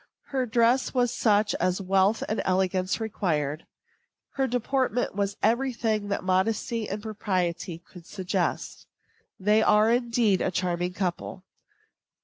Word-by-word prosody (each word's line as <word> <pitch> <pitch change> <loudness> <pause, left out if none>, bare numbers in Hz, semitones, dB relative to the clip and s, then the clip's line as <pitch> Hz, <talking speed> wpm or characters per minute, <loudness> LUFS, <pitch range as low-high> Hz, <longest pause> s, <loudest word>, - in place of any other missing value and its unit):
Her 260 -3 -1
dress 235 +4 +2
was 245 -1 +2
such 210 -3 +2
as 185 +2 +1
wealth 195 +2 +2
and 215 - -1
elegance 185 +1 0
required. 160 -9 -2 0.6
Her 270 -1 0
deportment 250 0 0
was 200 +1 -2
every 255 +3 +2
thing 220 -3 -1
that 200 - -2
modesty 215 +4 0
and 205 +2 -5
propriety 185 -5 -2
could 170 0 -16
suggest. 190 -3 -3 0.5
They 210 +3 +3
are, 215 +1 +4
indeed, 235 -5 +2
a - - +1
charming 180 0 -1
couple. 185 0 -4
205 Hz, 130 wpm, -26 LUFS, 185-230 Hz, 0.6 s, are